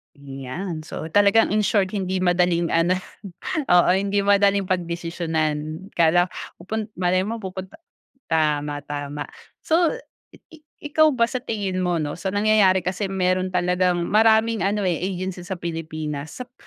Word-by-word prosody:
Ayan. 140 +5 -6
So, 160 - -6
talagang 205 +4 +4
in 210 0 +1
short 195 -3 +2
hindi 190 -2 -2
madaling 175 -1 +2
ano, 165 +2 +2 0.7
oo, 175 -5 +4
hindi 200 +1 0
madaling 200 -1 +3
pagdesisyonan. 165 -1 -2
Kala 175 +2 +4 0.3
pupun 215 +4 -3 0.2
malay 185 +1 +2
mo 225 +2 -4
pupunta 190 - -8 0.5
tama 150 -2 0
tama. 145 0 -5 0.4
So, 330 0 +2 0.4
i - - -21
i 320 - -13 0.3
ikaw 310 +1 +4
ba 235 - +4
sa 250 +2 -3
tingin 200 -6 -3
mo, 180 -1 0
'no, 150 -2 -2
sa 175 +3 -4
nangyayari 205 -2 +3
kasi 190 +2 -2
meron 185 -1 0
talagang 180 -1 +1
maraming 220 +1 +3
ano, 200 +1 0
eh, 175 -3 0
agency 185 0 -3
sa 190 - -3
Pilipinas 155 -3 -5
sap 245 - -35
185 Hz, 145 wpm, -23 LUFS, 165-200 Hz, 0.7 s, talagang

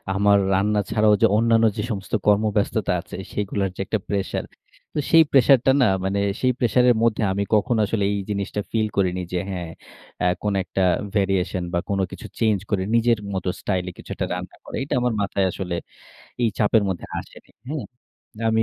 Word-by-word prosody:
আমার 100 +1 +4 0.2
রান্না 105 +2 +2
ছাড়াও 105 -1 +4
যে - - +7
অন্যান্য 115 0 +4
যে - - 0
সমস্ত 100 +1 -6
কর্মব্যস্ততা 105 -1 +2
আছে, 95 - -10 0.2
সেগুলার 100 -1 -1
যে - - -16
একটা 110 - -1
প্রেশার। 100 -2 -1 0.5
তো - - -1
সেই 165 -1 +8
প্রেশারটা 135 -1 +5
না - - +6 0.2
মানে 100 +1 0 0.2
সেই 130 - +3
প্রেশারের 125 +1 +4
মধ্যে 115 -1 +2
আমি 100 +1 0
কখনো 115 +2 +2
আসলে 105 -1 -1
এই 100 - -1
জিনিসটা 100 0 -2
ফিল 110 -1 +1
করিনি 90 -2 +1
যে 90 - +1
হ্যাঁ 90 -3 -4 0.5
অ্যা 90 - +2 0.2
কোনো 105 -2 0
একটা 95 0 -1 0.3
variation 95 -2 0
বা 85 - +2
কোনো 100 -1 +1
কিছু - - -8
চেঞ্জ 110 -4 +2
করে 100 -3 0
নিজের 115 -1 +3
মতো 95 -1 -2
স্টাইলে 90 -2 -2
কিছু - - -13
একটা - - -2
রান্না - - -6
করা। - - -8
এটা 135 - -4
আমার 125 -1 +1
মাথায় 100 -1 0
আসলে 90 -1 -4 0.7
এই 115 - +4
চাপের 105 0 +3
মধ্যে 95 - -4
আসেনি, - - -13 0.2
হ্যাঁ? 145 -5 -4 0.6
আমি 110 0 +3
105 Hz, 180 wpm, -23 LUFS, 95-115 Hz, 0.7 s, সেই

